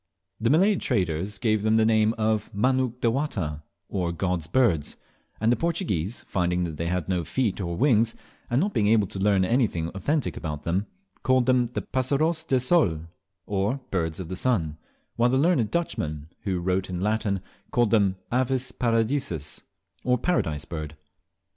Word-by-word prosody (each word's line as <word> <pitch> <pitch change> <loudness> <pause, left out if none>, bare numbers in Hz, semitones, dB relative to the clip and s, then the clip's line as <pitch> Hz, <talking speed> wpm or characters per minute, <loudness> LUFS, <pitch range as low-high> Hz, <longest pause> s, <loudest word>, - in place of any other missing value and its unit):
The 115 - +1
Malay 190 +7 +4
traders 95 - -1
gave 110 -1 +1
them 110 +1 +2
the 110 0 +4
name 110 0 +3
of 110 -1 0
"Manuk 125 +2 +1
dewata," 115 - -1 0.3
or 90 -3 -1
God's 85 -1 -2
birds; 90 - +1 0.4
and 110 +2 +3
the - - +4
Portuguese, 140 - -1
finding 90 -1 0
that 80 -3 -4
they 85 - -2
had 90 -1 -1
no 90 -2 0
feet 110 +2 -1
or 85 -2 -3
wings, 115 -4 +3 0.3
and 120 - +2
not 200 +5 0
being 105 - +2
able 110 -1 +4
to 95 - -6
learn 100 -1 +3
anything 100 -8 +1
authentic 145 - -1
about 75 -2 -5
then, 90 +6 -1 0.3
called 130 -1 +3
them 125 -1 +3
"Passaros 140 +7 0
de 130 -5 +2
Col," 105 - +2 0.4
or 105 +6 0
Birds 80 -3 -1
of 90 - -5
the 95 - -4
Sun; 90 -10 0 0.4
while 120 +1 +4
the 130 - +2
learned 140 -7 +3
Dutchmen, 80 - -2 0.2
who 95 -3 0
wrote 95 +2 0
in 90 -1 -3
Latin, 105 0 0 0.3
called 120 -3 +2
them 100 -4 +3 0.2
"Avis 130 0 0
paradiseus," 115 - -1 0.4
or 125 0 +2
Paradise 80 - 0
Bird. 80 -2 -6
110 Hz, 165 wpm, -26 LUFS, 90-125 Hz, 0.4 s, Malay